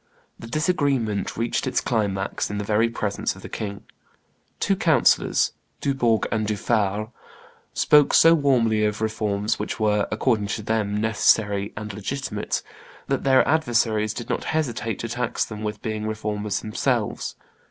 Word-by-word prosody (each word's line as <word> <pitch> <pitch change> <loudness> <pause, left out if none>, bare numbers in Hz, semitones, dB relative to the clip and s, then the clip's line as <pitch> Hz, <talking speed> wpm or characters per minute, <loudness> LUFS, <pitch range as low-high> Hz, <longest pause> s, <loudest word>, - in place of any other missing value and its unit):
The 115 - -9
disagreement 140 - 0
reached 115 +3 -1
its 130 - +1
climax 100 -5 -1
in 105 - -3
the 105 - -2
very 110 +3 +2
presence 105 -3 -2
of - - -13
the - - -8
king. 100 -2 -5 0.8
Two - - +2
councillors, - - +3 0.3
Dubourg 120 -5 +1
and 110 -1 0
Dufaure, 105 0 0 0.6
spoke 150 -1 +5
so 165 0 +7
warmly 120 -8 +2
of 105 0 0
reforms 110 0 -1
which - - -4
were, 105 -1 +2
according 110 -1 +1
to 110 +2 -3
them, 105 -1 0
necessary 105 -2 +2
and 105 -1 -5
legitimate, 105 +1 -3 0.5
that - - 0
their 130 -1 +4
adversaries 115 -8 +1
did 120 - -6
not 125 - -2
hesitate 120 -8 -1
to 115 - -4
tax 120 +1 -1
them 105 -1 -8
with 105 -1 -4
being 110 -1 -3
Reformers 105 -1 -2
themselves. 110 -1 -1
110 Hz, 145 wpm, -24 LUFS, 105-120 Hz, 0.8 s, so